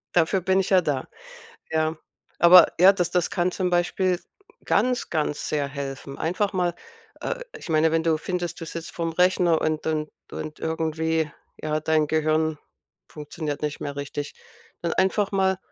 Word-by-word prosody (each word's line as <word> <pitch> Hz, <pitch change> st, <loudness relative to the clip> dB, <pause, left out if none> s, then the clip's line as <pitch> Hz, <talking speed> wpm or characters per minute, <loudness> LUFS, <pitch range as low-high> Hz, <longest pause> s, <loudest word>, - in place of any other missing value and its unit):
Dafür 175 Hz, +3 st, +3 dB
bin 190 Hz, +2 st, +2 dB
ich 185 Hz, -, -4 dB
ja 190 Hz, -2 st, +6 dB
da, 145 Hz, -6 st, -2 dB, 0.6 s
ja. 160 Hz, 0 st, +1 dB, 0.4 s
Aber 170 Hz, 0 st, +9 dB
ja, 190 Hz, +2 st, +8 dB
das 180 Hz, -3 st, 0 dB
das 180 Hz, -2 st, 0 dB
kann 180 Hz, -1 st, +1 dB
zum 180 Hz, -1 st, -1 dB
Beispiel 180 Hz, +1 st, +1 dB, 0.5 s
ganz, 250 Hz, -1 st, +1 dB
ganz 150 Hz, -2 st, -1 dB
sehr 145 Hz, -2 st, 0 dB
helfen. 140 Hz, -1 st, -6 dB
Einfach 185 Hz, +5 st, 0 dB
mal 180 Hz, -2 st, 0 dB, 0.5 s
äh, -, -, -3 dB, 0.2 s
ich -, -, -10 dB
meine, 160 Hz, 0 st, +3 dB
wenn 165 Hz, 0 st, +1 dB
du 160 Hz, -2 st, +2 dB
findest, 175 Hz, -2 st, -3 dB
du -, -, -4 dB
sitzt 165 Hz, +1 st, -6 dB
vor'm 165 Hz, -1 st, -4 dB
Rechner 180 Hz, -2 st, +3 dB
und 155 Hz, 0 st, -1 dB
und 155 Hz, -1 st, -1 dB, 0.2 s
und 155 Hz, 0 st, -6 dB
irgendwie, 160 Hz, -1 st, -1 dB, 0.3 s
ja, 155 Hz, 0 st, -1 dB
dein 155 Hz, 0 st, +2 dB
Gehirn 155 Hz, 0 st, +1 dB, 0.5 s
funktioniert 150 Hz, 0 st, -5 dB
nicht 150 Hz, -1 st, -2 dB
mehr 145 Hz, -1 st, -5 dB
richtig, 145 Hz, +1 st, -5 dB, 0.5 s
dann 170 Hz, -, 0 dB
einfach 195 Hz, +2 st, +1 dB
mal 190 Hz, -1 st, +2 dB
160 Hz, 165 wpm, -24 LUFS, 155-180 Hz, 0.6 s, Aber